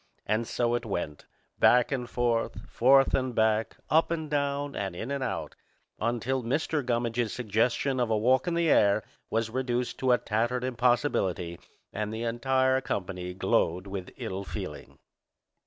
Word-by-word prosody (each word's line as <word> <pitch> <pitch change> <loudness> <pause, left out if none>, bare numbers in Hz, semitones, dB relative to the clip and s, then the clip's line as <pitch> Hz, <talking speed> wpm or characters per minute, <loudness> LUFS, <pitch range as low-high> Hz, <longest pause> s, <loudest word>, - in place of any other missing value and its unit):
And 110 +2 0
so 120 -1 0
it 120 - 0
went, 85 -8 -4 0.3
back 125 +2 +5
and 125 -3 -2
forth, 120 -2 -1
forth 135 +2 +4
and 130 -2 0
back, 110 0 +1
up 160 +1 +4
and 160 -3 -3
down, 140 0 -1
and 95 -3 -3
in 115 +9 -5
and 140 -1 -1
out, 125 - -3 0.5
until 120 +3 -1
Mr. 145 +4 -1
Gummidge's 120 -2 0
suggestion 125 +4 0
of 120 -2 +1
a 110 - +2
walk 130 +8 +3
in 170 - 0
the 170 -1 +2
air 100 +1 +4 0.3
was 115 0 -1
reduced 125 -1 -2
to 130 -1 +2
a 125 - +6
tattered 120 +4 -1
impossibility 120 - 0 0.3
and 105 0 -3
the 110 +1 -4
entire 130 +3 +1
company 90 -4 -4
glowed 90 -1 +1
with 95 -2 -6
ill 95 +1 -4
feeling. - - -7
120 Hz, 155 wpm, -28 LUFS, 110-130 Hz, 0.5 s, a